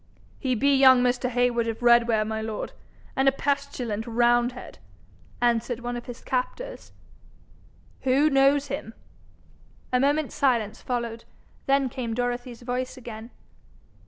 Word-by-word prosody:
'He 255 Hz, -2 st, 0 dB
be 280 Hz, +5 st, +3 dB
young 260 Hz, -2 st, +7 dB
Mr. 250 Hz, 0 st, +1 dB
Heywood 245 Hz, -1 st, +1 dB
of 225 Hz, +2 st, -4 dB
Redware, 235 Hz, -2 st, +4 dB
my 220 Hz, 0 st, -3 dB
lord, 220 Hz, -1 st, -5 dB, 0.4 s
and 265 Hz, 0 st, +2 dB
a -, -, 0 dB
pestilent 265 Hz, -6 st, -2 dB
roundhead,' 240 Hz, +1 st, +1 dB, 0.6 s
answered 240 Hz, 0 st, +1 dB
one 245 Hz, 0 st, -4 dB
of 240 Hz, +1 st, -7 dB
his 245 Hz, 0 st, -8 dB
captors. -, -, -4 dB, 1.1 s
'Who 270 Hz, +3 st, +3 dB
knows 275 Hz, +1 st, +4 dB
him?' 260 Hz, -5 st, -5 dB, 1.0 s
A 250 Hz, -, +4 dB
moment's 290 Hz, +2 st, +1 dB
silence 235 Hz, -6 st, 0 dB
followed. 235 Hz, -2 st, -3 dB, 0.4 s
Then 275 Hz, 0 st, +3 dB
came 235 Hz, -2 st, -4 dB
Dorothy's 245 Hz, 0 st, -3 dB
voice 250 Hz, +2 st, -3 dB
again. 230 Hz, -2 st, -9 dB
245 Hz, 130 wpm, -25 LUFS, 235-265 Hz, 1.1 s, young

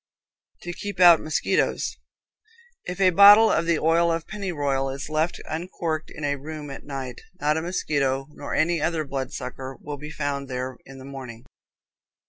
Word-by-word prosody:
To 175 Hz, -, -5 dB
Keep 205 Hz, +1 st, -6 dB
Out 175 Hz, -3 st, +8 dB
Mosquitoes. 155 Hz, -, 0 dB, 0.9 s
If 180 Hz, +1 st, -5 dB
a 185 Hz, -1 st, +5 dB
bottle 205 Hz, +4 st, +8 dB
of 165 Hz, -, +1 dB
the 170 Hz, -2 st, +3 dB
oil 165 Hz, +2 st, +3 dB
of 165 Hz, 0 st, -2 dB
pennyroyal 145 Hz, -10 st, -2 dB
is 140 Hz, +2 st, -6 dB
left 155 Hz, +2 st, 0 dB
uncorked 160 Hz, -1 st, -3 dB
in 150 Hz, -, -9 dB
a 145 Hz, -1 st, 0 dB
room 150 Hz, 0 st, -7 dB
at 135 Hz, -, -8 dB
night, 135 Hz, -3 st, -6 dB, 0.2 s
not 150 Hz, -1 st, +2 dB
a 160 Hz, -, -1 dB
mosquito, 140 Hz, -6 st, -1 dB
nor -, -, -6 dB
any 165 Hz, 0 st, +2 dB
other 155 Hz, 0 st, 0 dB
blood 135 Hz, -1 st, -4 dB
sucker, 130 Hz, +1 st, -6 dB
will 145 Hz, -1 st, -6 dB
be 150 Hz, +2 st, -8 dB
found 140 Hz, -2 st, -3 dB
there 130 Hz, 0 st, -4 dB
in 135 Hz, 0 st, -11 dB
the 130 Hz, -, -11 dB
morning. 130 Hz, -4 st, -9 dB
150 Hz, 170 wpm, -25 LUFS, 135-170 Hz, 0.9 s, Out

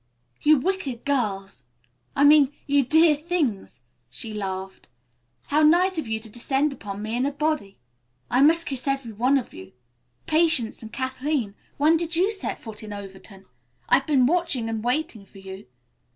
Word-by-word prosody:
"You 305 Hz, 0 st, +5 dB
wicked 280 Hz, -6 st, -3 dB
girls! 205 Hz, -, -2 dB, 0.5 s
I 285 Hz, -, +3 dB
mean, 290 Hz, -2 st, +6 dB
you 285 Hz, 0 st, +3 dB
dear 315 Hz, +4 st, +5 dB
things," 295 Hz, -, -2 dB, 0.3 s
she 215 Hz, -, -7 dB
laughed. 190 Hz, -2 st, -5 dB, 0.6 s
"How 300 Hz, +2 st, +3 dB
nice 345 Hz, +3 st, +4 dB
of 305 Hz, -, -5 dB
you 220 Hz, 0 st, -2 dB
to 225 Hz, -, -10 dB
descend 270 Hz, +6 st, -1 dB
upon 205 Hz, -4 st, -7 dB
me 220 Hz, +2 st, -3 dB
in 245 Hz, -, 0 dB
a 280 Hz, -, 0 dB
body. 290 Hz, -9 st, -2 dB, 0.5 s
I 250 Hz, -, +2 dB
must 330 Hz, +3 st, +4 dB
kiss 270 Hz, -3 st, -5 dB
every 270 Hz, -4 st, -1 dB
one 250 Hz, +6 st, +2 dB
of 255 Hz, -, -5 dB
you. 95 Hz, 0 st, -12 dB, 0.5 s
Patience 315 Hz, -8 st, +1 dB
and 220 Hz, -1 st, -10 dB
Kathleen, 260 Hz, -3 st, -2 dB, 0.2 s
when 310 Hz, +3 st, +4 dB
did 335 Hz, 0 st, -3 dB
you 375 Hz, +5 st, +2 dB
set 400 Hz, -, -2 dB
foot 220 Hz, -2 st, -9 dB
in 215 Hz, -1 st, -9 dB
Overton? 195 Hz, -1 st, -11 dB, 0.4 s
I've 275 Hz, -, +3 dB
been 275 Hz, -5 st, +4 dB
watching 300 Hz, -6 st, 0 dB
and 220 Hz, -1 st, -3 dB
waiting 250 Hz, -3 st, -2 dB
for 195 Hz, -, -18 dB
you. 190 Hz, -4 st, -10 dB
265 Hz, 165 wpm, -24 LUFS, 215-310 Hz, 0.6 s, mean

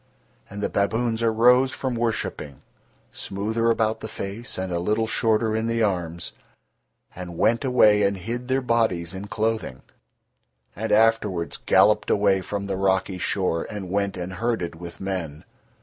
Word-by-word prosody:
And 100 Hz, +1 st, -6 dB
the -, -, +2 dB
baboons 115 Hz, +3 st, 0 dB
arose 120 Hz, +3 st, +4 dB
from 130 Hz, -1 st, -3 dB
worshipping, 115 Hz, -, -3 dB, 0.5 s
smoother 110 Hz, +4 st, -1 dB
about 110 Hz, -1 st, +1 dB
the -, -, -6 dB
face 110 Hz, +4 st, -6 dB
and 95 Hz, -1 st, -3 dB
a 85 Hz, -, 0 dB
little 105 Hz, +5 st, 0 dB
shorter 110 Hz, 0 st, +1 dB
in 110 Hz, +1 st, -1 dB
the 115 Hz, 0 st, +1 dB
arms, 85 Hz, -4 st, -2 dB, 0.8 s
and 90 Hz, -2 st, -7 dB
went 115 Hz, +7 st, +2 dB
away 110 Hz, -5 st, +5 dB
and 100 Hz, -1 st, +1 dB
hid 120 Hz, +7 st, -5 dB
their 130 Hz, 0 st, 0 dB
bodies 110 Hz, -8 st, 0 dB
in 95 Hz, +2 st, -6 dB
clothing, 110 Hz, -, -2 dB, 0.9 s
and 110 Hz, +3 st, -3 dB
afterwards 105 Hz, -6 st, +2 dB
galloped -, -, +3 dB
away 100 Hz, -2 st, +3 dB
from 100 Hz, +2 st, -4 dB
the 100 Hz, -1 st, -3 dB
rocky 95 Hz, -1 st, 0 dB
shore 90 Hz, -3 st, -1 dB
and 100 Hz, -4 st, -6 dB
went 100 Hz, 0 st, -1 dB
and 90 Hz, +1 st, -5 dB
herded 110 Hz, -3 st, -2 dB
with 85 Hz, +1 st, -10 dB
men. 90 Hz, -6 st, -4 dB
105 Hz, 150 wpm, -24 LUFS, 95-115 Hz, 0.9 s, away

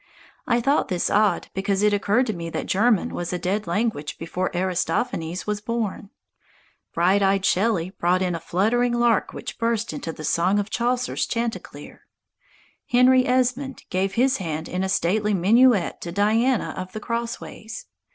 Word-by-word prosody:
I 235 Hz, -, +3 dB
thought 275 Hz, +5 st, +2 dB
this 180 Hz, -2 st, -1 dB
odd, 210 Hz, 0 st, +2 dB
because 195 Hz, +1 st, 0 dB
it 210 Hz, 0 st, +4 dB
occurred 210 Hz, +5 st, +2 dB
to 220 Hz, -, -2 dB
me 170 Hz, -2 st, -5 dB
that -, -, -4 dB
German 215 Hz, 0 st, +2 dB
was 175 Hz, -1 st, -4 dB
a 180 Hz, -, -1 dB
dead 195 Hz, +3 st, -2 dB
language 175 Hz, -4 st, -2 dB
before 180 Hz, +3 st, -3 dB
Aristophanes 180 Hz, -1 st, -1 dB
was 210 Hz, 0 st, -2 dB
born. 215 Hz, -3 st, -3 dB, 0.8 s
Bright 185 Hz, +4 st, +2 dB
eyed 195 Hz, 0 st, +2 dB
Shelley 185 Hz, -3 st, +1 dB
brought 180 Hz, 0 st, +1 dB
in 180 Hz, -1 st, -1 dB
a 165 Hz, -, -3 dB
fluttering 235 Hz, +9 st, +1 dB
lark 240 Hz, -3 st, +2 dB
which -, -, -8 dB
burst 230 Hz, -1 st, -1 dB
into 165 Hz, -, -5 dB
the 155 Hz, -, -10 dB
song 175 Hz, +6 st, +2 dB
of 205 Hz, +1 st, -2 dB
Chaucer's 245 Hz, +1 st, 0 dB
chanticleer. 230 Hz, -1 st, -5 dB, 0.8 s
Henry 255 Hz, +1 st, +5 dB
Esmond 255 Hz, +2 st, 0 dB
gave 190 Hz, +1 st, 0 dB
his 260 Hz, +3 st, +3 dB
hand 160 Hz, -4 st, -4 dB
in 185 Hz, +1 st, -2 dB
a 190 Hz, -, -1 dB
stately 205 Hz, +3 st, +1 dB
minuet 215 Hz, +2 st, +3 dB
to 170 Hz, -, -5 dB
Diana 220 Hz, +6 st, +1 dB
of 185 Hz, 0 st, -6 dB
the 215 Hz, -, -4 dB
Crossways. 230 Hz, -1 st, -5 dB
205 Hz, 160 wpm, -23 LUFS, 185-235 Hz, 0.8 s, Henry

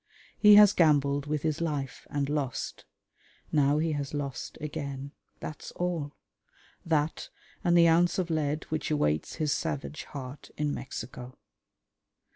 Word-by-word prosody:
He 210 Hz, -1 st, +8 dB
has 205 Hz, -1 st, +8 dB
gambled 145 Hz, -3 st, +3 dB
with 150 Hz, -1 st, -1 dB
his 160 Hz, 0 st, -1 dB
life 145 Hz, -5 st, -3 dB
and 140 Hz, -1 st, -1 dB
lost: 145 Hz, -4 st, -3 dB, 0.7 s
now 145 Hz, -1 st, +3 dB
he 160 Hz, +1 st, +1 dB
has 145 Hz, -1 st, -3 dB
lost 140 Hz, -4 st, -4 dB
again, 140 Hz, -2 st, -5 dB, 0.3 s
that's 150 Hz, -, -7 dB
all; 170 Hz, -5 st, -2 dB, 0.7 s
that 155 Hz, -2 st, 0 dB, 0.3 s
and 175 Hz, -2 st, +4 dB
the 170 Hz, -1 st, +7 dB
ounce 170 Hz, +2 st, +4 dB
of 180 Hz, -3 st, -1 dB
lead 155 Hz, -1 st, 0 dB
which 155 Hz, -1 st, -2 dB
awaits 75 Hz, -, 0 dB
his 155 Hz, -2 st, 0 dB
savage 150 Hz, +2 st, -3 dB
heart 135 Hz, 0 st, -8 dB
in 150 Hz, -1 st, 0 dB
Mexico. 125 Hz, 0 st, -7 dB
150 Hz, 135 wpm, -29 LUFS, 140-160 Hz, 0.7 s, He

